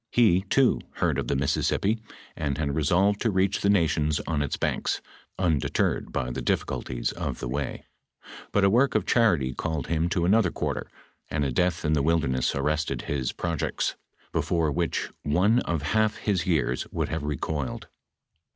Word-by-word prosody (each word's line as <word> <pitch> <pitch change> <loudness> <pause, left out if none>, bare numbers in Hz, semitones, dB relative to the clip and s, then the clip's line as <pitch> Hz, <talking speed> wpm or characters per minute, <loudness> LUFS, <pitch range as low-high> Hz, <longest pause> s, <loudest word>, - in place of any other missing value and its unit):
He, 100 -7 +4
too, 125 +6 +2
heard - - 0
of - - -3
the - - 0
Mississippi, 75 +10 +1 0.4
and 75 -2 -2
had 70 -2 -1
resolved 95 +7 +2
to 115 - +2
reach 95 0 +1
the 100 - +2
nations 75 -6 +2
on 80 -3 -1
its 70 - -2
banks, - - -1 0.4
undeter 80 -7 +1
red - - -7
by 60 -1 -2
the - - -4
difficulties - - -1
of - - -4
the - - -4
way; 70 +2 -3 0.7
but 100 - +2
a 100 - +6
work 125 +5 +3
of - - +2
charity 85 - +3
called 80 +1 -3
him 85 +1 +1
to 85 -1 +1
another 100 0 +4
quarter, - - -3 0.4
and 75 0 0
a 70 - -1
death 90 +4 0
in 75 - +2
the 75 - +2
wilderness 70 -5 +1
an'ested 75 +3 -1
his 70 -4 -2
projects, 85 -4 -2 0.4
before 80 -3 +1
which 85 +2 -1
one 95 +11 +3
of 85 - -2
half 110 +8 +1
his 95 -5 -1
years 70 -8 +1
would - - -2
have 80 0 -2
recoiled 75 -1 -3
80 Hz, 170 wpm, -26 LUFS, 70-95 Hz, 0.7 s, a